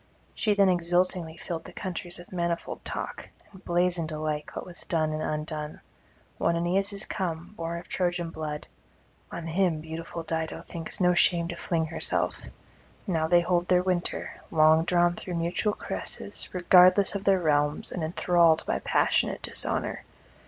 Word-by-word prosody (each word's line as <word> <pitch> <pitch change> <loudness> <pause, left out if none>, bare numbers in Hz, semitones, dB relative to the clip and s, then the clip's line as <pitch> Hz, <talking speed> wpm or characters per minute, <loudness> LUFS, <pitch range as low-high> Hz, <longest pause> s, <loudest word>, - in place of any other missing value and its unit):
She 210 -2 +1
then 200 -1 +5
exultingly 175 -1 +1
filled 165 -2 -5
the - - -9
countries 175 -1 -5
with 175 - -13
manifold 170 -1 -2
talk, - - -5 0.2
and 190 -2 -15
blazoned 175 -2 +1
alike 155 -1 -3
what - - -5
was 175 -1 -9
done 155 -2 0
and 155 - -3
undone: 150 0 -4 0.6
one 170 - +2
Aeneas 185 +4 +1
is 200 +1 -2
come, 175 -1 -4
born 165 -1 -4
of 170 - -9
Trojan 175 -2 -1
blood; 150 -2 -5 0.7
on 170 - -6
him 170 -1 +1
beautiful 165 +1 -6
Dido 160 0 -3
thinks 165 -2 -6
no 180 -1 +4
shame 170 -1 +3
to 175 - -4
fling 165 -1 -1
herself; 160 +1 0 0.6
now 165 -6 0
they 175 +1 +5
hold 175 0 +1
their 180 -1 +4
winter, 180 -2 -2
long 160 +1 +5
drawn 175 0 +3
through 175 0 -6
mutual 170 +5 0
caresses, - - -4
regardless 180 +2 +6
of 200 -1 -3
their 195 -1 +4
realms 150 -2 +1
and 180 - -4
enthralled 170 0 +3
by - - 0
passionate - - +1
dishonour. - - -1
170 Hz, 160 wpm, -27 LUFS, 160-180 Hz, 0.7 s, regardless